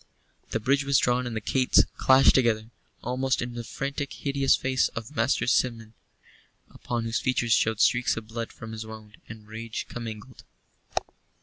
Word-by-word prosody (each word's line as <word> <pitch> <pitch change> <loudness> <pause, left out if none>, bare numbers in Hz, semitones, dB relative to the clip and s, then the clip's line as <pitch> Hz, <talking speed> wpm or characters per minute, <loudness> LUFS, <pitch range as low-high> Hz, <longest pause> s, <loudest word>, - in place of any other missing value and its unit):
The 115 - -1
bridge 140 +5 +2
was 140 -1 +3
drawn 125 0 +2
and 115 - -5
the - - -1
gates 130 +4 +3
clashed 130 +1 +6
together, 115 -3 +1 0.3
almost 130 +2 0
in 125 0 -3
the 120 0 -5
frantic, 140 +4 -4
hideous 140 -1 +2
face 130 0 +1
of 115 +5 -7
Master 120 +1 +1
Simeon, 115 -3 0 0.8
upon 120 -1 -4
whose 115 +1 -1
features 120 -2 +1
showed 110 -1 +2
streaks 120 -2 +3
of 110 -1 -6
blood 115 0 -5
from 110 0 -9
his 110 0 -5
wound 110 -1 -11
and 110 -1 -10
rage 110 +1 -5
commingled. 115 +1 -8
120 Hz, 165 wpm, -26 LUFS, 110-130 Hz, 0.8 s, clashed